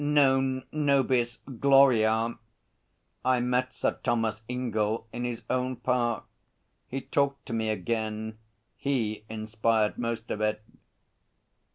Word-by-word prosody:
Non 135 -3 +3
nobis 135 -5 +2 0.2
gloria! 120 -5 +5 0.9
I 130 -1 +3
met 125 +1 +1
Sir - - -1
Thomas 115 -3 0
Ingell 115 -3 -1
in 120 +1 -3
his 120 -1 -4
own 130 0 0
park. 120 -3 0 0.6
He 135 +1 -4
talked 140 0 0
to - - -5
me 110 -1 0
again. 110 +1 -2 0.4
He 110 -6 -1
inspired 110 0 0
most 115 -1 -3
of 105 - -2
it.' 105 0 0
120 Hz, 110 wpm, -28 LUFS, 110-130 Hz, 0.9 s, gloria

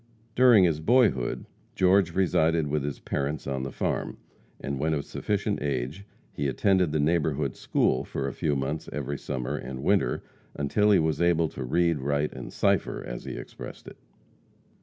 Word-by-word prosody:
During 120 -5 +6
his 80 -4 +2
boyhood, 105 - +2 0.3
George 95 -2 +3
resided 80 -4 +2
with 75 0 -1
his 70 -1 -4
parents 70 +1 -3
on 70 -1 -2
the 65 0 -4
farm, - - -2 0.4
and 70 -1 -4
when 80 +2 +1
of 70 - -3
sufficient 105 0 -2
age 70 +6 -3 0.3
he 70 - -1
attended 90 +4 +2
the 75 - 0
neighborhood 75 -3 +1
school 65 - +1
for - - -4
a - - -4
few 75 -2 0
months 70 +3 -3
every 70 -1 -4
summer 60 -1 -3
and 65 +1 -6
winter 100 +4 +1 0.3
until 105 +9 +1
he 100 - +6
was 80 -1 0
able 85 -2 +3
"to 65 - -6
read, 85 +4 +1
write 70 +2 -1
and - - -8
cipher," - - 0
as - - -7
he - - -5
expressed - - -9
it. - - -11
75 Hz, 170 wpm, -27 LUFS, 70-90 Hz, 0.4 s, During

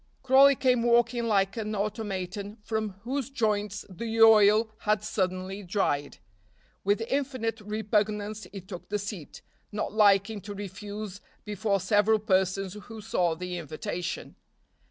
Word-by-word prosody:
Crawley 270 +1 +7
came 255 -2 +2
walking 240 0 +3
like 195 -3 +2
an 215 -1 -3
automaton 205 -1 -4
from 220 -2 -2
whose 265 +2 -2
joints 210 -6 -1
the 225 +4 -4
oil 220 0 +6
had 210 -1 +1
suddenly 190 -1 -2
dried. 175 -7 -1 0.7
With 205 +3 +2
infinite 240 -3 -2
repugnance 210 0 -1
he 195 - -7
took 180 -1 -10
the 210 - 0
seat, 205 -6 -7 0.3
not 210 0 -3
liking 205 0 +4
to 205 +1 -7
refuse 205 0 -7 0.2
before 205 -1 0
several 210 +3 +3
persons 190 -2 0
who 220 +2 -10
saw 180 -6 0
the 180 +1 -5
invitation. 165 +2 -5
210 Hz, 130 wpm, -28 LUFS, 195-220 Hz, 0.7 s, Crawley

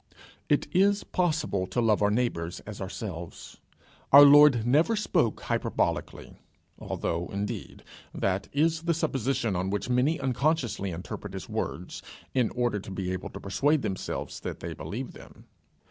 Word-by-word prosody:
It - - +2
is 200 +2 +3
possible 155 - -1
to 120 - -2
love 110 -3 +3
our 105 - +4
neighbour 105 -7 0 0.2
as 105 -2 -8
ourselves. 95 -3 -7 0.5
Our 145 +1 +11
Lord 145 -5 +7
never 155 - +3
spoke 170 - 0
hyperbolically, - - -2 0.4
although, 85 +1 -3
indeed, 100 +1 -5 0.3
that 95 0 -1
is 160 +3 +1
the 170 0 0
supposition 135 - -1
on 90 +2 -1
which 105 +5 -2
many 130 +6 +2
unconsciously 130 -6 0
interpret 95 +3 -7
his 95 - -6
words, - - -4 0.3
in 125 -4 +2
order 120 -4 0
to 95 - -10
be 95 -1 -3
able 95 - -5
to - - -9
persuade 140 +10 +1
themselves 95 - -4
that - - -6
they - - -5
believe - - -6
them. - - -15
120 Hz, 145 wpm, -28 LUFS, 95-150 Hz, 0.5 s, Our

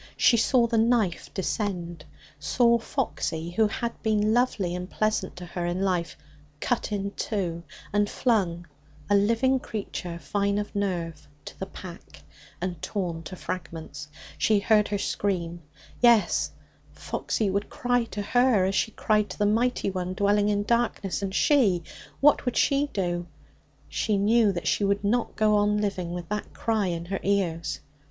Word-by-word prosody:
She 240 - +5
saw 235 +1 +4
the 230 -1 +1
knife 220 -6 +1
descend 175 -5 -3 0.3
saw 235 - +3
Foxy, 170 - -3
who 215 +4 +3
had 235 +2 -4
been 215 0 +2
lovely 225 -7 +1
and 180 +1 -5
pleasant 215 -3 -1
to 180 -1 -8
her 175 0 -5
in 175 +2 -2
life, 175 -4 -1 0.4
cut 240 +3 -1
in 200 -1 -2
two 180 -6 -2 0.3
and 205 0 +2
flung 185 -8 0 0.5
(a - - +6
living 230 +6 +3
creature, 195 -6 -5
fine 200 +6 -1
of 210 0 -4
nerve) 175 -6 -2 0.2
to - - -10
the 190 - -4
pack, 170 - -11 0.4
and 175 -2 -4
torn 175 -5 -3
to 165 +3 -8
fragments. 160 -5 -6 0.3
She 215 - +4
heard 210 0 +3
her 205 - -1
scream. 175 -4 -2 0.4
Yes; 235 -3 +4 0.4
Foxy 210 -4 -2
would 200 +2 -1
cry 245 -1 0
to 205 -2 -5
her, 245 -3 +3
as 190 - 0
she 210 - +1
had - - -24
cried 210 -1 +2
to 185 - -7
the 210 - +2
Mighty 225 0 +1
One 185 0 -3
dwelling 205 +1 +2
in 205 0 +1
darkness. 235 -4 0
And 195 -1 -3
she? 210 - +3 0.4
What 290 +1 +5
would 250 - -1
she 280 0 +3
do? 175 -3 -2 0.6
She 210 -2 0
knew 215 +1 +4
that 175 -3 -4
she - - +2
could 200 0 +1
not 230 +4 0
go 215 -1 +3
on 205 0 +2
living 195 -4 -2
with 175 -1 -5
that 210 0 -4
cry 220 -4 0
in 170 -1 -3
her 195 +2 -3
ears. 180 -5 -1
200 Hz, 165 wpm, -26 LUFS, 180-220 Hz, 0.6 s, a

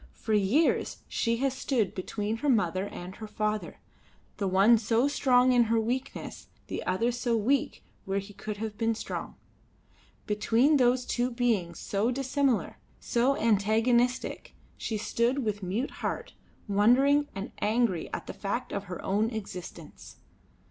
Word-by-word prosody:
For 220 - -3
years 215 +11 +2
she 230 -1 0
had 270 +1 0
stood 255 -6 0
between 210 +3 -3
her 290 +5 -1
mother 190 -5 +1
and 180 -1 -8
her 215 - -7
father, 215 0 -2 0.6
the 200 - -1
one 200 +5 +5
so 230 +4 +2
strong 255 -3 +3
in 240 -1 +5
her 225 +1 +2
weakness, 250 +4 -4 0.2
the - - -5
other 210 +7 +1
so 240 -1 0
weak 250 +5 0 0.2
where 195 0 -1
he 200 +1 -5
could 210 +1 -6
have 215 0 -5
been 225 -1 +1
strong. - - -5 0.9
Between 230 +8 +3
those 250 -1 +3
two 245 +1 0
beings 230 -9 0
so 205 +4 -1
dissimilar, 270 -1 0 0.2
so 250 +4 +1
antagonistic, 230 +3 +1 0.2
she 220 - -3
stood 235 +4 0
with 205 -1 -2
mute 200 +9 -2
heart - - -3 0.3
wondering 260 +8 +4
and 195 +1 -5
angry 215 -5 +1
at - - -5
the - - -6
fact 210 +5 -3
of 200 0 -3
her 180 -2 -6
own 210 +3 +1
existence. 185 -7 -8
225 Hz, 150 wpm, -28 LUFS, 205-245 Hz, 0.9 s, one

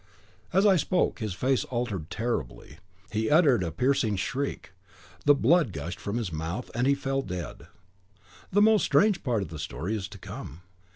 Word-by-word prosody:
As 195 +2 +3
I 195 -3 +6
spoke, 180 0 +1
his 105 -5 -3
face 130 +5 +1
altered 115 -10 -3
terribly; 110 - -4 0.3
he 110 0 0
uttered 145 - +5
a 85 -2 -2
piercing 125 - +1
shriek, 135 +8 -3 0.5
the 145 0 +7
blood 140 - +3
gushed 85 +2 -6
from 100 +3 -3
his 105 -8 -3
mouth, 80 +10 -4
and 120 +3 +1
he 140 - +4
fell 135 0 -1
dead. 90 - -6 0.8
The 205 +2 +4
most 220 -1 +5
strange 210 -2 +3
part 115 -7 0
of 85 - -8
the 80 -1 -8
story 85 +8 -3
is 100 -3 -4
to 100 - -11
come. 85 -3 -9
120 Hz, 175 wpm, -27 LUFS, 90-140 Hz, 0.8 s, the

